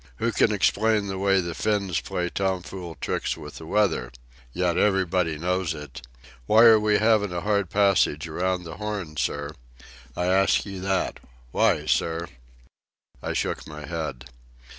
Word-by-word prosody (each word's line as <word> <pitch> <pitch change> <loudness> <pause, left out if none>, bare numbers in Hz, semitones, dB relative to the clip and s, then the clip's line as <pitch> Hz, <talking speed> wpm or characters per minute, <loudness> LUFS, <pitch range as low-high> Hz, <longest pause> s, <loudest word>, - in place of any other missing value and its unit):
"Who - - -1
can - - +3
explain 110 -1 +2
the 95 -1 -4
way 95 -1 +3
the 85 -1 -4
Finns 100 -4 0
plays 90 -1 -3
tom 95 -2 -1
fool 90 -3 -8
tricks - - -2
with - - -9
the 80 - -10
weather? 90 -11 +1 0.4
Yet 90 +3 0
everybody 90 -5 +1
knows 90 0 -1
it. 75 -5 -9 0.5
Why 110 +2 +6
are 115 -2 +8
we 105 -1 +2
havin' 105 -2 +3
a 90 -1 -3
hard 100 -2 0
passage 95 -6 +2
around 90 +3 -1
the 80 -1 -8
Horn, 105 -7 -4
sir? 70 +1 -2 0.6
I 90 - 0
ask 95 +2 +3
you 100 -2 -7
that. 95 0 -1 0.3
Why, - - +2
sir?" 85 +1 0 0.9
I - - -3
shook - - -2
my 75 0 -8
head. 75 -7 -5
90 Hz, 160 wpm, -25 LUFS, 80-100 Hz, 0.9 s, are